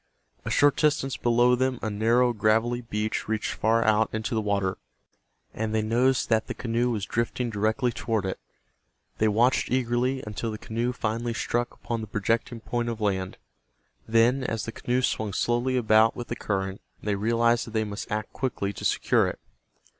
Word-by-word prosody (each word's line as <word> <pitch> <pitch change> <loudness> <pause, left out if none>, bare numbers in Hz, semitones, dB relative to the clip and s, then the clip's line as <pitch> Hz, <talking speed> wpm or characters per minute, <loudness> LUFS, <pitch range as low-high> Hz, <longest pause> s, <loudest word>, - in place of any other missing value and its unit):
A - - -4
short 145 -1 +4
distance 145 -4 +1
below 120 +1 +3
them 130 0 +1
a 110 - -1
narrow 120 +4 +3
gravelly 115 +3 +1
beach 110 -2 -3
reached 110 0 -1
far 115 +1 +1
out 110 0 +3
into 110 +1 -3
the 110 - +1
water, 100 -2 -1 0.7
and 110 0 -2
they 110 - +1
noticed 125 +4 +2
that 110 -1 +2
the - - -4
canoe 120 0 0
was 105 -4 -2
drifting 115 +2 -2
directly 110 +4 +1
toward 110 -3 -2
it. 95 - -3 0.8
They 110 - +3
watched 115 +5 +2
eagerly 125 +1 0
until 105 +2 -4
the 110 - -4
canoe 115 +3 -2
finally 115 0 -2
struck 120 0 -1
upon 115 -1 -4
the 110 - -6
projecting 115 +3 -1
point 120 +2 -2
of 115 -1 -4
land. 95 -3 -1 0.7
Then, 120 +4 +3
as 115 -4 -2
the 115 - -4
canoe 125 +2 -1
swung 110 -4 -1
slowly 120 +4 +1
about 110 -1 +4
with 120 - -7
the 120 - -2
current, 95 -3 -3 0.2
they 105 - 0
realized 115 +3 +2
that - - -8
they 110 - +2
must 105 -1 -6
act 110 +1 -3
quickly 110 -6 -2
to - - -9
secure - - +2
it. - - -4
115 Hz, 180 wpm, -26 LUFS, 110-120 Hz, 0.8 s, short